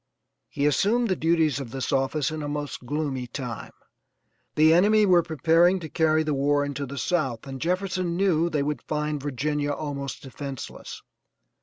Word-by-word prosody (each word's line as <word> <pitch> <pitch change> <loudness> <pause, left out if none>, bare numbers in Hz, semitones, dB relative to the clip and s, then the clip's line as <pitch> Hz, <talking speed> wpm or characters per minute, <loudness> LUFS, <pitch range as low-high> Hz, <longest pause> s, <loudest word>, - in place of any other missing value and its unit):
He 140 - -1
assumed 215 - +2
the 185 - +2
duties 160 -4 +2
of 135 -4 -6
this 130 +2 -4
office 135 +2 0
in 155 0 -4
a 145 - -4
most 145 -3 -5
gloomy 140 -4 -2
time. 120 -2 -6 0.9
The 155 +1 +6
enemy 210 +5 +5
were 180 -3 +5
preparing 165 +3 +3
to 160 -3 -7
carry 160 -1 +2
the 155 -1 -1
war 145 +1 +2
into 140 0 -4
the 140 +2 -7
South, 135 -4 -1
and 135 -1 -7
Jefferson 180 0 -1
knew 170 -4 +2
they 150 -4 0
would 150 +1 -2
find 150 -1 -2
Virginia 145 +1 -2
almost 140 -2 -4
defenseless. 135 -1 -8
150 Hz, 165 wpm, -25 LUFS, 140-170 Hz, 0.9 s, The